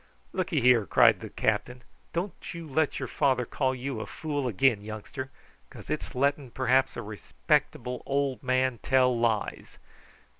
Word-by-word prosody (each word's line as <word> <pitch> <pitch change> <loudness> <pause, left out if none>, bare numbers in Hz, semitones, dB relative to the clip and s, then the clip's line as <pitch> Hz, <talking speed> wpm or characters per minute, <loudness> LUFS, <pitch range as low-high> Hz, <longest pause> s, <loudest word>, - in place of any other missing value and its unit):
"Look'ye - - 0
here," 120 -4 +5
cried - - +5
the - - -8
captain, 125 0 -1 0.3
"don't 175 0 -4
you 170 -1 -7
let 150 +1 0
your - - -3
father 130 -4 +1
call 130 +2 -1
you 125 -3 -4
fool 145 -1 -3
again, 120 -1 +2
youngster, 110 +5 -6 0.4
because - - -10
it's - - -3
letting 140 0 +1
perhaps 130 +2 +1
a 120 - -4
respectable 105 - -1
old 140 -1 0
man 130 -2 +1
tell 130 -1 +3
lies. 115 -3 -1
130 Hz, 145 wpm, -28 LUFS, 120-135 Hz, 0.4 s, here